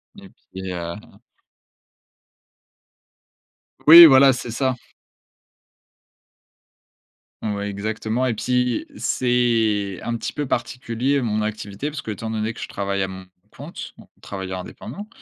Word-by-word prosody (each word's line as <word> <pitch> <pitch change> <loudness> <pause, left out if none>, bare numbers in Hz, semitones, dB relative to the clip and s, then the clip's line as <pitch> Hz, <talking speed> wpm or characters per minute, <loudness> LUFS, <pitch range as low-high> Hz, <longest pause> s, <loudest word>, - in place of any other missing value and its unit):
Et 200 -1 -13 0.2
puis 95 0 -6
heu 85 -1 -5 2.9
Oui, 170 +2 +12
voilà, 135 -2 +7
c'est 120 -1 -6
ça. 130 +2 0 2.7
Ouais, 105 -1 -3
exactement. 110 +4 -2
Et 125 - 0
puis, 125 +1 0
c'est 115 -6 +1
un 120 0 -2
petit 110 - -5
peu 145 - -3
particulier 125 +2 -1
mon 110 -3 -1
activité, 105 +4 -4
parce 150 -1 -6
qu'étant 110 +1 -6
donné 110 0 -2
que - - -12
je - - -5
travaille 100 0 -3
à 95 - 0
mon 95 0 -10 0.3
compte, - - -9
donc - - -17
travailleur 95 -1 -6
indépendant 205 - -9
110 Hz, 120 wpm, -22 LUFS, 100-125 Hz, 2.9 s, Oui